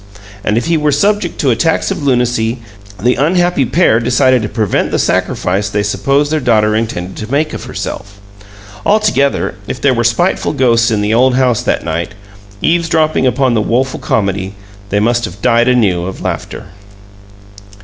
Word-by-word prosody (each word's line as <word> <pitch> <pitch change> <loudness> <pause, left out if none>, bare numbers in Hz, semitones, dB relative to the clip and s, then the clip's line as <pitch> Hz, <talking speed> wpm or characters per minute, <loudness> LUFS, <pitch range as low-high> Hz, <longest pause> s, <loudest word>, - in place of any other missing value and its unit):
And 105 +1 0
if 120 - -1
he 165 -1 +1
were 150 -1 +1
subject 200 +4 0
to 135 - +2
attacks 160 +8 0
of - - -3
lunacy, 120 -3 0 0.4
the 125 +5 +2
unhappy 175 +1 +1
pair 155 -8 +3
decided 125 +1 +2
to 105 - -3
prevent 110 -5 -1
the - - -1
sacrifice 100 +3 0
they 105 0 -1
supposed 140 +8 0
their 155 - +1
daughter 110 -5 +2
intended 95 -5 -3
to 110 - -6
make 150 +2 0
of - - -6
herself. 100 +1 -7 0.6
Altogether, 205 -10 +1
if - - -5
there - - +2
were - - 0
spiteful - - 0
ghosts 120 -2 +2
in 110 -2 0
the 105 +1 0
old 125 +2 +3
house 125 -2 +2
that 125 - -1
night, 85 +3 -3 0.5
eavesdropping 160 -4 +1
upon 130 0 +1
the 110 - +1
woeful 130 +5 -1
comedy, 100 -2 -2 0.3
they 100 - +1
must 120 +3 +1
have 100 -2 -9
died 120 +1 +2
anew 100 -9 +2
of 95 - -6
laughter! - - -5
120 Hz, 170 wpm, -14 LUFS, 105-140 Hz, 0.6 s, pair